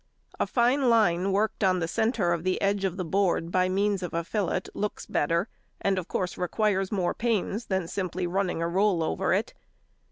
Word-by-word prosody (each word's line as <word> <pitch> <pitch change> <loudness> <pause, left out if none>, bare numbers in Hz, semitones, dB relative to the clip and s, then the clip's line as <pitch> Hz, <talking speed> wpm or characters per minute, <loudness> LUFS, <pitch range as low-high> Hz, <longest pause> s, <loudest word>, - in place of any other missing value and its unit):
A - - +1
fine 250 +2 +2
line 195 -5 +3
worked 210 +2 0
on 185 -1 +3
the 165 -2 -1
centre 210 -2 +1
of 170 -1 -3
the 185 0 0
edge 200 0 +1
of 190 -1 -2
the 185 - -2
board 175 -1 +1
by 185 0 +2
means 200 +1 +1
of 180 -2 -5
a 170 - 0
fillet 185 0 -1
looks 210 +1 -3
better, 170 +7 0 0.3
and 195 -1 +1
of 180 - -7
course 180 -1 -3
requires 195 +1 0
more 185 -4 0
pains 230 -1 -1
than 190 -3 -1
simply 185 -1 -3
running 180 -2 -1
a - - 0
roll 185 -1 +2
over 80 - -1
it. - - 0
190 Hz, 195 wpm, -27 LUFS, 175-205 Hz, 0.3 s, line